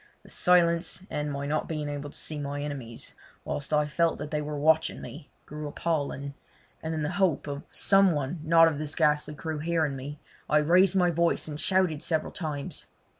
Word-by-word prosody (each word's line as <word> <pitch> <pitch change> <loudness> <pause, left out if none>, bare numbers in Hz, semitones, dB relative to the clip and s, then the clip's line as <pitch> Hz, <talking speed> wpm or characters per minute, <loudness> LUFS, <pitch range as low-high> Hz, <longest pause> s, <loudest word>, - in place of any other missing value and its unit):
The - - -15
silence, 175 +1 +3
and 150 0 -2
my 140 0 -3
not 155 +2 -1
being 155 -2 -3
able 145 0 -4
to - - -9
see 155 -1 -2
my 145 0 -3
enemies, 135 -6 -6 0.3
whilst 145 - -4
I 150 -1 +3
felt 165 +3 +1
that 150 - -6
they 150 -1 0
were 150 0 -4
watching 160 +2 +2
me, 150 0 -10 0.2
grew 150 0 -6
appalling, 145 -2 -2 0.5
and 160 0 -3
in 155 - -2
the 150 - -1
hope 180 -7 +2
of 145 -1 -4
some 195 -1 +4
one 145 +3 -2
not 165 +1 +6
of 150 -3 -1
this 150 -1 -2
ghastly 150 0 +2
crew 160 0 -4
hearing 160 -2 0
me 140 +3 -7 0.3
I 150 - +4
raised 180 +5 +4
my 180 -2 +4
voice 170 0 +1
and 150 -1 -5
shouted 185 -6 +2
several 160 -2 -1
times. 150 -5 -5
150 Hz, 195 wpm, -28 LUFS, 145-165 Hz, 0.5 s, not